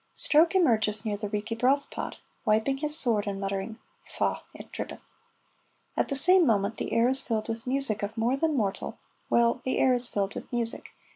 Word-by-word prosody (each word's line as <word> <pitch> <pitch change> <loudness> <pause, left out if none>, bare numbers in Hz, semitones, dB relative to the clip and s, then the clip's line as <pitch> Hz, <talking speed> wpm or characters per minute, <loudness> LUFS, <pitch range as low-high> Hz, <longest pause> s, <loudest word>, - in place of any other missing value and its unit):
Stroke 325 +5 +4
emerges 220 - +4
near 210 -2 -1
the 210 0 -5
Reekie 215 +2 -4
Broth 275 +3 +1
Pot, - - -5 0.3
wiping 220 +5 +1
his 300 +2 +2
sword 220 -8 +1
and 200 -1 -3
muttering, 195 +3 -4 0.3
"Faugh! - - -2
it - - -12
drippeth!" - - -8 0.8
At - - 0
the 275 - -2
same 360 +6 +6
moment 215 -5 +1
the - - -4
air 230 +1 +3
is 265 +1 +1
filled 220 -4 -3
with 225 +1 -5
music 260 -5 +1
of 205 +3 -5
more 235 +4 +1
than 310 +1 0
mortal 200 -4 -3 0.3
well, 235 +1 +2
the 260 - -1
air 260 - +3
is 245 0 0
filled 200 0 -2
with - - -9
music. 235 -2 -3
230 Hz, 195 wpm, -27 LUFS, 215-270 Hz, 0.8 s, same